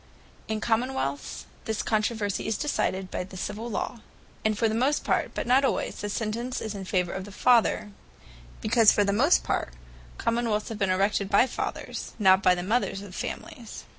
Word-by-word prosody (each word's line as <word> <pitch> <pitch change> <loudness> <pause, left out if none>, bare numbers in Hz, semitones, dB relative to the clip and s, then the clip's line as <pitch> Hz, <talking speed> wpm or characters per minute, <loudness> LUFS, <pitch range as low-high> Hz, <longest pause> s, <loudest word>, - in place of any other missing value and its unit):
In 220 0 -2
Common 240 +4 +1
wealths, 140 - -3 0.2
this 220 -1 -1
controversie 215 -2 0
is 220 - 0
decided 190 -10 -1
by - - -2
the 185 +1 -10
Civill 210 +5 -4
Law: 230 +2 -3 0.4
and 215 -1 +1
for 225 - +3
the 215 - -1
most 260 +6 +1
part, - - 0
(but - - -2
not 255 +3 +4
alwayes) 270 - 0
the 205 - -3
sentence 230 +4 -2
is 220 -1 -4
in 195 -2 -6
favour 180 -2 0
of 190 - -4
the 205 - -10
Father; 230 -1 +3 0.7
because 225 0 +5
for 205 - +3
the 200 0 +1
most 280 - +4
part - - -1 0.4
Common 235 +1 0
wealths 210 -1 -1
have 220 -2 -6
been 195 -2 +1
erected 195 +1 +1
by 200 +4 +5
the - - -9
Fathers, - - -4
not 190 -3 +5
by 180 -1 +5
the 175 - -4
Mothers 200 -1 0
of 195 -3 -10
families. 230 +4 -6
215 Hz, 195 wpm, -27 LUFS, 195-235 Hz, 0.7 s, because